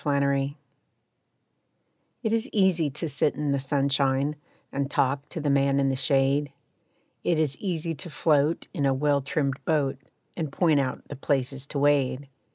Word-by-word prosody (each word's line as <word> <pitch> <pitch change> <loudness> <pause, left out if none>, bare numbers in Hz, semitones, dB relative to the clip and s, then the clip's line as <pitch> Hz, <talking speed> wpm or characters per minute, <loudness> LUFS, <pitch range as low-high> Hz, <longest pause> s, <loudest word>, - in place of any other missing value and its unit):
Practice= 140 -1 +1 1.7
It 220 -1 0
is 230 +4 0
easy 185 -7 +3
to 150 +4 -4
sit 145 0 0
in 150 -1 -1
the 140 - +1
sunshine 140 +1 +1 0.4
And 140 0 -2
talk 140 0 0
to - - -5
the 145 -2 0
man 140 0 +3
in 135 0 +2
the 135 - 0
shade; 140 0 +1 0.7
It 170 - +2
is 150 -3 +1
easy 170 -4 -2
to 160 +3 -8
float 150 0 +1
in 145 -7 +1
a 135 - +2
well 145 +1 +2
trimmed 140 -1 -2
boat, 140 -4 0 0.4
And 155 -5 -3
point 155 -1 +3
out 130 -2 -3
the 145 - -5
places 135 -1 -1
to 145 - -5
wade. 140 -1 +2
140 Hz, 165 wpm, -26 LUFS, 135-155 Hz, 1.7 s, easy